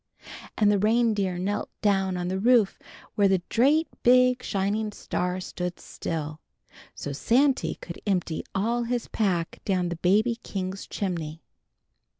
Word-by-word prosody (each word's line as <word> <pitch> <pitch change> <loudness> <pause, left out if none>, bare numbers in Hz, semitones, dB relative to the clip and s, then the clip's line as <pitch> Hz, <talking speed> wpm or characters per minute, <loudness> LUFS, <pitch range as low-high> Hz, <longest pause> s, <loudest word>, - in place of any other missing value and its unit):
An' 210 -2 +4
the 205 -1 +3
reindeer 210 -4 +2
knelt 200 +3 -2
down 195 -3 +2
on 175 0 -2
the 190 +1 -1
roof 230 -2 +3 0.3
where 200 -1 +4
the 190 -2 +2
drate 290 +7 +3
big 250 0 +5
shining 205 +2 -1
star 180 -2 -2
stood 180 -1 -5
still, 155 -1 -5 0.6
so 145 - -5
Santy 260 - +2
could 170 - -9
empty 180 -5 0
all 230 +5 +1
his 240 0 -2
pack 180 -6 -1
down 180 -3 0
the 170 - -4
baby 215 +7 +2
king's 190 0 -5
chimney." 165 -5 -4
195 Hz, 140 wpm, -26 LUFS, 180-230 Hz, 0.6 s, big